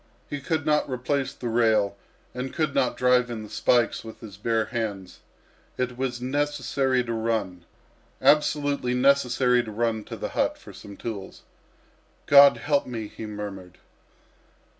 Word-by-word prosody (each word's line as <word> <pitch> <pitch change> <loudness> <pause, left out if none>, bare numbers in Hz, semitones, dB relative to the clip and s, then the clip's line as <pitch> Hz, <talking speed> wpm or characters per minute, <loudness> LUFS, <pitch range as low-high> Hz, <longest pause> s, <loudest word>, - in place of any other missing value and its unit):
He 145 -1 -5
could 155 +1 -1
not 150 -2 +2
replace 130 +1 -1
the 125 -3 -7
rail 110 -4 +2 0.4
and 130 +1 -4
could 155 -3 0
not 130 - +1
drive 125 -1 +3
in 115 -2 -5
the 105 - -10
spikes 120 +2 +2
with 110 -1 -10
his 105 -4 -10
bare 110 +2 0
hands. 105 -6 -5 0.6
It 125 -1 -2
was 125 -1 -3
necessary 135 -1 0
to 115 -1 -4
run, 110 -6 -2 0.5
absolutely 145 -4 +2
necessary 125 -2 +3
to 115 - -8
run 110 0 -1
to - - -7
the - - -4
hut - - 0
for - - -13
some 100 -1 -11
tools. 105 -5 -7 0.8
"God 140 0 +8
help 145 -1 0
me!" 115 -4 -5
he 110 - -8
murmured. 100 -4 -7
125 Hz, 150 wpm, -25 LUFS, 110-135 Hz, 0.8 s, God